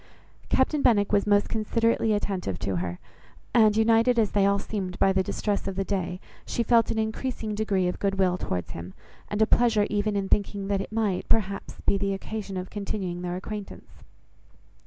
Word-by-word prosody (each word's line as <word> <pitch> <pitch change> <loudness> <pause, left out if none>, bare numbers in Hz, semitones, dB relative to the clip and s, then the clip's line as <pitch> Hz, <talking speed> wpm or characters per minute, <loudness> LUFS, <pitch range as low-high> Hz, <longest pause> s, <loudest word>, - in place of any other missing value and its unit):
Captain 280 +3 +2
Benwick 205 -6 +3
was 205 0 +2
most 205 0 +4
considerately 230 +1 +1
attentive 195 - -1
to 95 0 -2
her; 90 0 -3 0.6
and, 215 -2 +5
united 230 +2 +4
as 220 -3 +2
they 200 -1 +3
all 200 0 +3
seemed 195 -2 -4
by 195 - +3
the 190 - +2
distress 200 +2 -2
of 195 - -3
the 195 - 0
day, 185 -2 -2 0.2
she 235 - -1
felt 230 0 +4
an - - -1
increasing 220 0 -2
degree 205 -3 0
of 180 - -3
good 195 -1 0
will 185 -2 +3
towards 90 - -3
him, 85 +2 -8 0.3
and 210 +1 +2
a - - +5
pleasure 225 -2 +3
even 205 0 0
in 195 -1 -1
thinking 200 0 0
that 200 -1 +1
it - - -7
might, 215 -4 -1
perhaps, 200 -3 0
be 195 - +2
the 200 0 0
occasion 200 0 -5
of 185 0 -5
continuing 190 -3 -4
their 180 0 -3
acquaintance. 205 +2 -8
205 Hz, 190 wpm, -26 LUFS, 190-220 Hz, 0.6 s, and